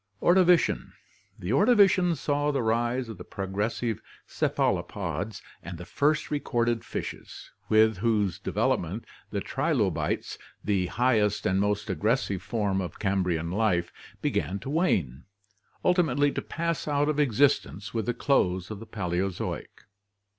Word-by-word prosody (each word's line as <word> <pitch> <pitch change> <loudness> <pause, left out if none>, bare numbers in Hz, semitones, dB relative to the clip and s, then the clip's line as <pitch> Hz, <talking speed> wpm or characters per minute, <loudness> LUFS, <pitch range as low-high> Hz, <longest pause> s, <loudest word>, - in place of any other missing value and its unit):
Ordovician. 180 -1 +3 0.2
— - - -36
The 90 - -3
Ordovician 190 - +5
saw 145 +1 0
the 140 -4 0
rise 120 +2 0
of 110 -5 -8
the - - -7
progressive 105 +5 -3 0.2
cephalopods 105 0 -1 0.2
and 85 +1 -7
the 85 - -8
first 150 - 0
recorded 120 -5 0
fishes, - - -7 0.2
with 110 -1 +4
whose 105 -4 +1
development 90 +7 -1 0.2
the 100 - -2
trilobites, 105 - -1 0.2
the 95 -3 +1
highest 110 -2 +1
and 95 +1 +2
most 105 +1 0
aggressive 105 0 0
form 100 -3 -1
of 90 -4 -6
Cambrian 90 -5 0
life, 90 -4 +1 0.3
began 95 - 0
to 135 - -5
wane, 90 - 0 0.6
ultimately 145 -6 +3
to - - -3
pass 170 -2 -3
out 145 0 +1
of 150 -1 0
existence 120 -6 +1
with 110 -3 -2
the 120 - +1
close 95 -9 +1
of 105 - -6
the 115 - -10
Paleozoic. 95 -2 -3
110 Hz, 130 wpm, -27 LUFS, 95-140 Hz, 0.6 s, Ordovician